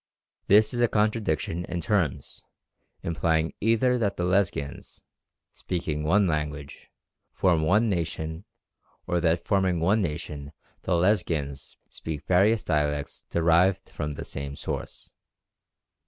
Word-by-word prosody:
This 105 +5 +5
is 120 - -1
a 120 - +5
contradiction 105 -7 0
in 85 0 -4
terms, 85 -4 -1 0.6
implying 80 -1 0
either 115 +3 +2
that 100 -4 0
the 90 - -1
Lesghians, 90 -6 -1 0.5
speaking 80 -4 -3
one 95 +6 +3
language, 75 -3 -4 0.4
form 90 -4 +2
one 105 +9 +3
nation, 80 -2 -3 0.6
or 90 - 0
that 85 0 +1
forming 95 -3 +1
one 100 +7 +2
nation 75 -4 -5 0.3
the 95 - -1
Lesghians 85 -7 0
speak 80 -3 -7
various 100 +5 +3
dialects 75 -2 -1
derived 85 +3 +2
from 75 0 -4
the - - -7
same 70 0 -5
source. - - -6
85 Hz, 120 wpm, -26 LUFS, 75-100 Hz, 0.6 s, This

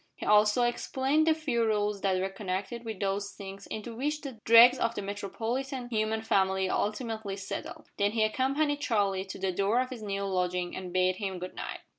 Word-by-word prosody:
He - - -7
also 210 +3 +5
explained 265 +5 +1
the 320 - +5
few 270 -7 0
rules 210 -2 0
that 190 -2 +1
were 190 - 0
connected 195 +4 -4
with 220 -4 -6
those 200 0 -2
sinks 195 0 -9
into 220 +2 -6
which 300 +5 -2
the 265 -6 -8
dregs 235 +3 +8
of 230 0 0
the - - -3
metropolitan 230 +6 -4
human 220 -1 0
family 190 -2 +2
ultimately 215 0 -2
settle. 195 -1 -6
Then 205 +1 +1
he 225 -1 +2
accompanied 275 +6 +1
Charlie 200 -7 +1
to 190 - -7
the 190 0 -1
door 200 +6 +1
of 255 0 -1
his 245 -3 -7
new 200 -1 -3
lodging 180 -2 -1
and 185 -1 -6
bade 185 0 +2
him 195 -2 -3
good 180 +1 -6
night. - - -6
210 Hz, 195 wpm, -29 LUFS, 195-240 Hz, -, dregs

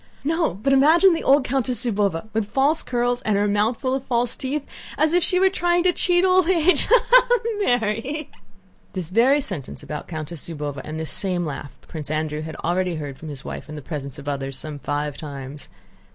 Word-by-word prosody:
"No, 325 - 0
but 245 +8 0
imagine 325 +7 +6
the 330 - -2
old 275 +1 +5
Countess 255 -1 -1
Zúbova, 200 -5 0
with 220 -2 -1
false 275 +8 +2
curls 245 0 -1
and 215 -4 0
her 205 +1 +2
mouth 210 +3 +1
full 260 0 -1
of 265 -1 -2
false 240 -2 0
teeth, 280 +2 -3 0.3
as 310 +2 +2
if 355 -1 +3
she 365 - +3
were 380 0 +4
trying 350 -2 +1
to 365 -1 +4
cheat 355 +1 +4
old 370 -1 +4
age.... 365 0 +3
Ha, - - +4
ha, - - +6
ha! 485 0 +4 0.2
Mary!" 245 - -1 0.6
This 180 -4 -4
very 245 +9 +4
sentence 180 - -7
about 150 -1 -6
Countess 155 0 -6
Zúbova 145 -3 -5
and 155 +1 -6
this 160 -3 -3
same 180 -3 -1
laugh 145 -1 -7
Prince 155 -3 -7
Andrew 155 0 -2
had 160 0 -7
already 180 +1 0
heard 145 -3 -6
from 160 - -8
his 140 -3 -8
wife - - -7
in 155 - -7
the 150 - -7
presence 140 -3 -6
of 145 0 -10
others 135 -2 -3
some 150 -2 -7
five 145 0 -3
times. 140 -1 -8
215 Hz, 210 wpm, -22 LUFS, -, 0.6 s, imagine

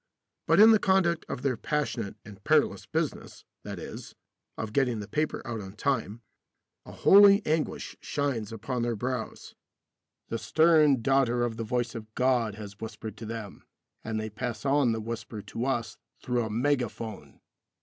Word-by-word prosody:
But - - +4
in 220 +2 +9
the 220 - +5
conduct 190 -4 +2
of - - -5
their 135 -3 +1
passionate 120 -6 -2
and 100 -1 -13
perilous - - +2
business, - - -3 0.2
that - - -7
is, - - -9 0.4
of 110 -1 -5
getting 125 -4 +1
the 105 - -6
paper 155 +5 -2
out 115 -3 -4
on 95 -1 -9
time, 115 -1 -2 0.6
a - - -9
holy 200 +1 +7
anguish 155 0 -1
shines 130 -8 -2
upon 115 +3 -3
their 120 0 0
brows. 125 +1 -4 0.8
The 115 - -2
stern 155 -4 +4
daughter 130 -2 +2
of 120 -2 -1
the 115 - -4
voice 120 +1 -1
of 110 -2 -8
God 125 -5 +1
has 105 -1 -10
whispered 110 -1 -7
to 110 - -7
them, 110 -3 -7 0.4
and 110 -1 -3
they 110 0 -4
pass 120 +2 -5
on 140 -3 +3
the 110 0 -2
whisper 115 -1 -6
to 120 - -4
us 115 -5 -2 0.2
through 120 -2 -1
a - - -4
mega 125 +2 +1
phone. 110 -3 -9
120 Hz, 170 wpm, -28 LUFS, 110-140 Hz, 0.8 s, in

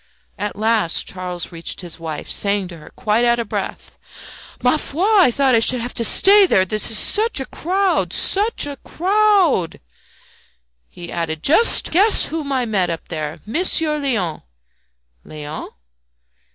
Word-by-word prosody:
At 210 0 -4
last 215 -5 0
Charles 180 -2 -6
reached 165 +1 -5
his 175 -2 -8
wife, 160 -2 -7
saying 200 -2 -1
to 170 - -11
her, 155 - -15
quite 215 +2 -1
out 240 0 +2
of 235 -2 -4
breath - - -7 0.6
"Ma 250 +5 +2
foi! 305 +3 -4
I 415 - +4
thought 265 +1 +1
I 230 - +4
should 250 +2 +3
have 240 +2 -5
had - - -21
to 235 - +1
stay 395 - +5
there. 190 - +2
There 215 +3 -4
is 215 +1 +1
such 435 - +1
a 265 - -4
crowd 375 +6 -2
SUCH 415 -1 +3
a 285 -1 -7
crowd!" 380 - 0 1.1
He 175 -1 -11
added 160 -2 -5
"Just 385 +11 +5
guess 405 +6 +4
whom 305 -3 -4
I 260 -2 -1
met 195 -6 -1
up 165 -1 -7
there! 155 -2 -6
Monsieur 305 - 0
Léon!" 215 - -3 0.8
"Léon?" 150 0 -9
235 Hz, 160 wpm, -18 LUFS, -, 1.1 s, stay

